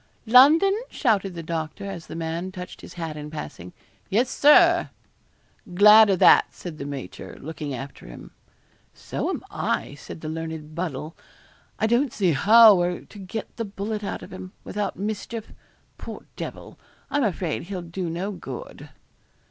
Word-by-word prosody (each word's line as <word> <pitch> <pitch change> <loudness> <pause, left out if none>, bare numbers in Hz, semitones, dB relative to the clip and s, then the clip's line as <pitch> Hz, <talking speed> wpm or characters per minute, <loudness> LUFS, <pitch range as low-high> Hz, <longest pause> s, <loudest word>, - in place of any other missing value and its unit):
'London?' 290 - +7 0.2
shouted 200 -7 0
the 165 - -6
doctor, 165 +4 -4
as 190 -4 -7
the - - -8
man 165 +3 -3
touched 180 -1 -9
his - - -12
hat 165 -3 -5
in 150 0 -7
passing. 120 - -8 0.4
'Yes, 240 +6 +1
Sir.' 340 +3 +5 0.9
'Glad 210 +2 +8
o' 195 - +4
that,' - - +6
said 170 -4 -8
the 140 - -5
major, 140 -2 -8
looking 150 -2 -5
after 135 +3 -9
him. - - -11 0.6
'So - - -4
am - - -3
I,' - - -2
said 145 +3 -10
the 155 - -6
learned 160 -1 -6
Buddle. 160 -2 -4 0.6
'I - - +1
don't 240 +3 +2
see 190 -5 +2
how 220 +8 +8
we're 175 -1 0
to 205 - -14
get 200 +3 -7
the 230 - -2
bullet 210 +1 -4
out - - -4
of - - -11
him, 185 0 -9
without 205 -1 -3
mischief. 215 +2 -5 0.5
Poor - - -8
devil, - - -8 0.3
I'm 290 - +1
afraid 175 -6 -2
he'll 185 -1 -5
do 175 +1 -4
no 180 +5 -3
good.' 195 - -9
185 Hz, 160 wpm, -24 LUFS, 160-215 Hz, 0.9 s, Glad